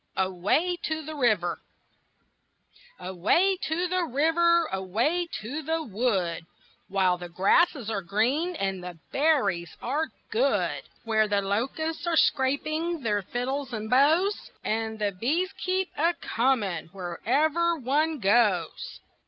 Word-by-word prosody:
AWAY 190 - +1
TO 315 0 -3
THE 310 +2 -7
RIVER 215 - +1 1.4
Away 195 - +2
to 345 +3 -1
the 365 0 0
river, 335 +4 +3
away 230 - 0
to 275 +9 -4
the 320 +2 -1
wood, 195 - -1 0.4
While 185 -2 +1
the 175 0 -7
grasses 235 - +2
are 200 -3 -1
green 250 - 0
and 195 - -2
the 180 -2 -7
berries 255 - +1
are 295 +6 -1 0.2
good! 465 +3 +1 0.2
Where 220 -1 +2
the 205 -1 +1
locusts 275 - -2
are 340 - +1
scraping 310 +6 +1
their 210 -4 0
fiddles 255 +5 -3
and 220 -1 -4
bows, 320 +10 +3
And 220 0 -2
the 210 -1 0
bees 300 - -1
keep 370 0 -2
a 335 +3 +2
coming 225 - 0
wherever 285 - 0
one 300 +4 0
goes. 205 -5 +1
255 Hz, 125 wpm, -27 LUFS, 200-320 Hz, 1.4 s, river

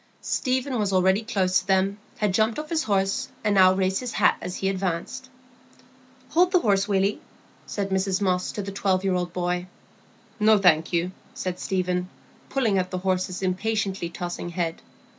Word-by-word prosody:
Stephen 260 -2 -1
was 205 -2 0
already 190 +2 +3
close 190 -4 +1
to 185 - -12
them, 195 +1 +2 0.2
had 210 -5 0
jumped 220 +2 +2
off 305 +1 -6
his 320 -1 0
horse, 195 -2 0
and 210 -1 +2
now 185 -2 +7
raised 190 0 +1
his 250 -3 -5
hat - - +4
as 180 - -5
he 190 - -2
advanced. 195 +7 -3 1.0
"Hold 355 +4 +3
the 365 - +5
horse, 200 -2 +2
Willy," 195 0 +1 0.5
said 200 -1 -3
Mrs 190 0 +1
Moss 185 -2 0
to 205 - -4
the 195 - -5
twelve 190 -1 0
year 190 -1 +1
old 180 -1 -1
boy. 180 0 -2 0.7
"No, 215 0 +5
thank 170 -5 +3
you," 175 +1 0 0.2
said 185 -1 -4
Stephen, 180 -1 -1 0.4
pulling 225 -8 +1
at 185 0 -2
the 185 - -3
horse's 185 0 -1
impatiently 195 -1 -1
tossing 175 0 -5
head. 170 -1 -3
190 Hz, 175 wpm, -25 LUFS, 185-210 Hz, 1.0 s, now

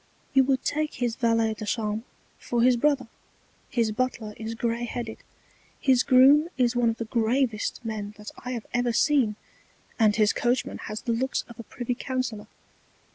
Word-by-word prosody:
You 270 - +6
would 265 -1 0
take 305 +1 -1
his 240 -2 -1
Valet 230 -3 +2
de 215 - -8
Chambre 215 0 -2 0.4
for 240 -1 0
his 250 0 +5
Brother, 265 0 +1 0.6
his 230 -3 +1
Butler 225 -2 -2
is 225 0 -5
grey 235 +1 -1
headed, 235 -2 -5 0.6
his 260 -3 +4
Groom 280 +5 +6
is 245 -1 +2
one 240 -1 +3
of 225 - -2
the 230 - -4
Gravest 230 0 0
men 210 -2 -4
that 210 0 -9
I 250 - -4
have 235 -3 -5
ever 240 0 +1
seen, 260 -5 +3 0.6
and 215 -2 +4
his 215 -1 +3
Coachman 245 +1 -1
has 215 0 -4
the 240 - -1
Looks 260 +3 -1
of 235 -1 -13
a - - -6
Privy 245 +3 -4
Counsellor. 240 -4 -3
235 Hz, 175 wpm, -26 LUFS, 220-255 Hz, 0.6 s, You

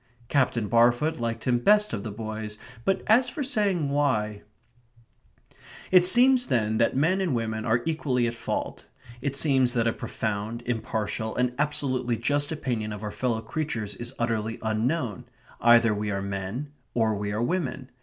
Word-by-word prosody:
Captain 125 -5 +1
Barfoot 120 +7 +3
liked 115 -1 -3
him 120 -1 +2
best 210 +10 +4
of 100 - -2
the 110 - -5
boys; 110 0 -5 0.3
but 195 - +1
as 245 +3 +4
for 285 +4 -4
saying 205 - +1
why... 110 -8 0 1.5
It 180 -1 +7
seems 250 +3 +6
then 110 -2 +1
that 115 - +2
men 165 +8 +2
and 170 -9 0
women 110 -1 -2
are 120 +1 +1
equally 140 -6 0
at 120 - -1
fault. 115 - -4 0.3
It 140 0 -2
seems 135 -4 +3
that 115 -1 +2
a 115 - +2
profound, 110 +2 -4
impartial, 110 -1 -3
and 125 0 +1
absolutely 130 -5 0
just 145 +6 0
opinion 120 -8 -3
of 105 +1 -8
our 105 - -3
fellow 115 -2 -1
creatures 110 -6 -3
is 120 +5 -6
utterly 115 -1 -1
unknown. 110 - -1 0.4
Either 115 -1 +6
we 105 0 -3
are 100 -1 -2
men, 100 +8 -4 0.2
or 110 -2 +2
we 100 0 -3
are 110 +3 -1
women. 135 -4 -2
120 Hz, 165 wpm, -26 LUFS, 110-145 Hz, 1.5 s, It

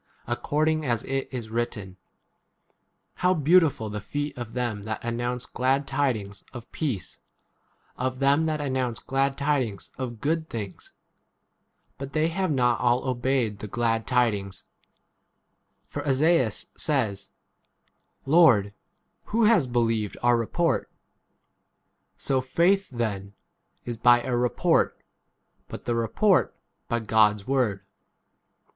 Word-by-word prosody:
according 155 +6 0
as 120 -5 -1
it 135 0 -3
is 120 -4 -6
written, 110 -5 -3 1.2
How 180 +1 +2
beautiful 155 -6 +3
the 105 0 -5
feet 145 +6 -4
of 120 -2 -7
them 120 -5 -2
that 110 +1 -4
announce 120 +1 -2
glad 135 +2 0
tidings 125 -9 -2
of 120 -2 -10
peace, 130 - -4 0.8
of 130 +1 -2
them 140 +4 +3
that 155 -1 -1
announce 130 -4 -1
glad 135 +1 0
16 140 - -5
tidings 125 - -1
of 120 -3 -5
good 160 +4 -1
things! 100 -5 -7 1.1
But 135 0 -7
they 155 +1 +2
have 185 +2 -1
not 125 -4 +2
all 125 +2 +1
obeyed 125 -4 0
the 105 - -6
glad 115 +1 -1
tidings. 105 -7 0 1.2
For - - -6
Esaias 140 -4 +2
says, 110 -11 -1 1.0
Lord, 135 - +6
l? 100 - -11 0.5
who 230 +2 +1
has 210 - +4
believed 115 -4 0
our 120 0 +5
report? 160 +9 0 1.3
So 135 -1 0
faith 180 +9 +2
then 105 -5 -3 0.5
[is] 120 -1 -4
by 120 +1 +5
a 125 - -1
report, 120 0 +2 0.7
but - - -9
the 120 - -1
18 - - +1
report 185 - +2 0.3
by 120 - 0
God's 105 -2 +3
word. 125 -8 0
125 Hz, 125 wpm, -26 LUFS, 115-145 Hz, 1.3 s, Lord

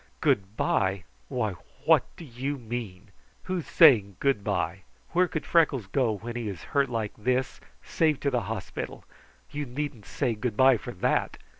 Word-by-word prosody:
"Good 100 +2 +1
bye! 95 0 +1 0.2
Why, 110 - -1 0.3
what - - +6
do 170 - -10
you 135 +2 -4
mean? 110 -5 -6 0.3
Who's 185 -3 -3
saying 110 - +6
good 135 -8 +1
bye? 95 -2 -1 0.3
Where 180 +2 +3
could 155 - -4
Freckles 150 - +3
go, 115 +2 +1
when 115 +4 -6
he 120 -2 -3
is 90 -5 -7
hurt 140 -2 +3
like 115 -3 -2
this, 125 +3 -1 0.2
save 155 -3 +1
to 140 - +1
the 125 -2 +1
hospital? 105 -5 -5 0.5
You 145 -1 -4
needn't 125 -4 -5
say 125 -5 -1
good 110 0 -3
bye 130 -1 +6
for - - -9
that. - - 0
120 Hz, 165 wpm, -27 LUFS, 105-140 Hz, 0.5 s, what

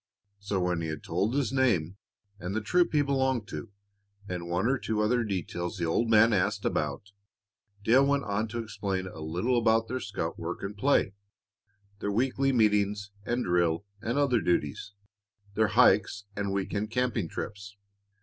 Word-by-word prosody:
So 100 -1 -2
when 90 -1 0
he 80 - -3
had 80 -1 -5
told 95 +9 -1
his 135 -4 0
name, 105 -10 +2 0.4
and 90 +3 -4
the 110 - 0
troop 175 +11 +2
he 150 -2 +3
belonged 130 -5 0
to, 115 - -7 0.6
and 90 -2 -5
one 90 +4 0
or 130 +1 +2
two 110 -3 -2
other 120 +3 +2
details 95 -2 -3
the 85 - -1
old 110 +8 +1
man 115 +1 +6
asked 100 +1 0
about, 105 - -2 0.7
Dale 130 +6 +5
went 140 0 +2
on 100 +2 -1
to 115 +1 -4
explain 100 -3 -3
a 95 - -9
little 90 +11 0
about 115 0 +3
their 130 +2 -3
scout - - -4
work - - -5
and 100 +1 -4
play, 120 -3 +2 0.9
their 100 - -2
weekly 135 +5 +1
meetings 105 -3 +2 0.2
and 120 +1 0
drill 85 +1 +1 0.2
and 120 +5 -2
other 130 -6 +3
duties, 85 +2 -1 0.6
their 110 +1 +3
hikes 105 -2 +4
and 100 -1 -2
week 100 0 -2
end 105 +1 -1
camping 120 -5 0
trips. 100 -1 -7
105 Hz, 170 wpm, -28 LUFS, 95-120 Hz, 0.9 s, man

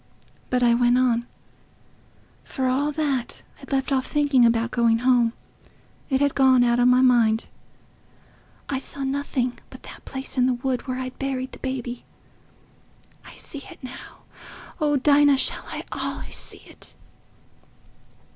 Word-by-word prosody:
But 250 0 +1
I 240 -1 +5
went 245 +1 +3
on, 240 -2 +1 1.2
for 265 - -4
all 270 +4 +1
that. 285 -5 -2 0.2
I'd - - -12
left 270 0 0
off 260 -1 +1
thinking 290 -4 +3
about 230 0 +2
going 230 -2 +3
home—it 245 +2 -2
had 285 -1 +2
gone 260 -2 +5
out 240 0 +2
o' 245 - +4
my 250 +1 +5
mind. 235 -3 +3 1.2
I 270 - -2
saw 275 +1 -7
nothing 265 -2 -2
but - - -13
that - - -12
place 265 0 -5
in 250 - +4
the 255 - +1
wood 255 +1 -3
where 255 -1 -2
I'd 255 0 -6
buried 265 -1 -3
the - - -12
baby... 250 -2 -4 1.2
I - - -12
see 285 - -9
it - - -12
now. 255 - -10 0.6
Oh 295 -2 +2
Dinah! 285 0 +5
shall - - -1
I - - -6
allays - - -4
see - - -6
it?" - - -10
255 Hz, 145 wpm, -24 LUFS, 245-275 Hz, 1.2 s, I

